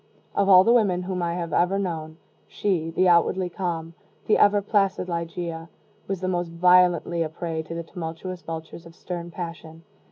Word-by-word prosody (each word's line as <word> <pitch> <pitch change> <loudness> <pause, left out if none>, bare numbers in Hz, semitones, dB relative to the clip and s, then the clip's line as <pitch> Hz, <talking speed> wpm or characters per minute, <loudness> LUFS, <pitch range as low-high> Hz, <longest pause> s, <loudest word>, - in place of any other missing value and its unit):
Of 200 0 +2
all 185 -1 +9
the 230 - +4
women 195 -7 +2
whom 180 -1 -3
I 170 0 -1
have 170 -3 -4
ever 180 +3 +2
known, 160 -5 -4 0.3
she, 175 -6 -1
the 185 +3 +2
outwardly 180 +1 +3
calm, 170 -3 -4 0.3
the 215 - +3
ever 205 0 +5
placid 195 -2 0
Ligeia, 170 -1 -4 0.4
was 195 -2 -3
the 185 - -2
most 175 -2 -1
violently 175 -1 +4
a 160 - -1
prey 160 0 -4
to 160 +1 -8
the 170 - -4
tumultuous 170 +2 -7
vultures 165 +1 -8
of 165 - -16
stern 175 -2 -6
passion. 165 -2 -8
175 Hz, 180 wpm, -24 LUFS, 165-185 Hz, 0.4 s, all